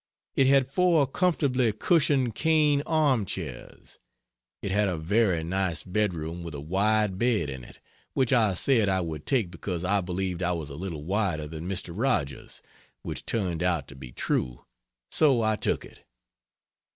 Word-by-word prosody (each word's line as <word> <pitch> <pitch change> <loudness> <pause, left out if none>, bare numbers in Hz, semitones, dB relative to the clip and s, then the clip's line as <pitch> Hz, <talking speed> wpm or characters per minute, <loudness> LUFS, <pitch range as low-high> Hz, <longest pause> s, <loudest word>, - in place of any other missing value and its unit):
It 135 - +4
had 135 -1 +3
four 170 -3 +3
comfortably 135 - +1
cushioned 135 - +2
cane 150 0 +3
arm 145 -8 +2
chairs. 95 - -7 0.6
It 100 - -2
had 105 +1 +2
a 90 -3 -1
very 90 0 +1
nice 85 -2 -1
bedroom 90 -4 -2
with 85 -3 -7
a - - -5
wide 100 +5 +1
bed 110 - +1
in 65 -2 -7
it; - - -14 0.4
which 130 -1 +2
I 110 -6 +3
said 115 0 +3
I 95 -1 +1
would 80 -3 -6
take 115 -10 +1
because 90 0 -4
I 100 +1 +2
believed 90 0 -3
I 90 0 +1
was 80 -4 -5
a - - -7
little 85 -3 -5
wider 95 -4 -1
than 80 +3 -6
Mr. 90 -2 -3
Rogers 100 - -2 0.4
which - - -6
turned 90 -7 -1
out 85 -5 0
to 70 - -11
be 65 -2 -10
true; 60 0 -2 0.5
so 135 -7 +3
I 110 0 +2
took - - -1
it. - - -16
95 Hz, 165 wpm, -27 LUFS, 85-125 Hz, 0.6 s, It